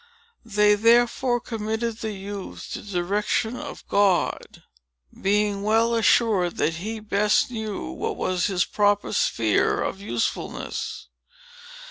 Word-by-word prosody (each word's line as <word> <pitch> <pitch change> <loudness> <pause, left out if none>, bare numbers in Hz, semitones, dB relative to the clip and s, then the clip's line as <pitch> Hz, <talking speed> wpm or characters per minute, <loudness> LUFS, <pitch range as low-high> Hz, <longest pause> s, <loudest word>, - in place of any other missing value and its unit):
They 210 -1 +4
therefore 240 +3 +3
committed 220 0 -3
the 220 -2 -3
youth 195 0 -7
to - - -5
the 205 - -11
direction 205 +5 0
of - - -8
God, 200 -3 +1 0.6
being 205 0 +1
well 225 +3 +2
assured 220 -5 +2
that 160 0 0
he 220 +6 -5
best 210 +2 +1
knew 220 -4 -4
what - - -4
was 185 0 0
his 185 -3 +1
proper 205 -1 +1
sphere 425 -2 +1
of 195 - -4
usefulness. 205 - -3
210 Hz, 120 wpm, -24 LUFS, 200-225 Hz, 0.6 s, They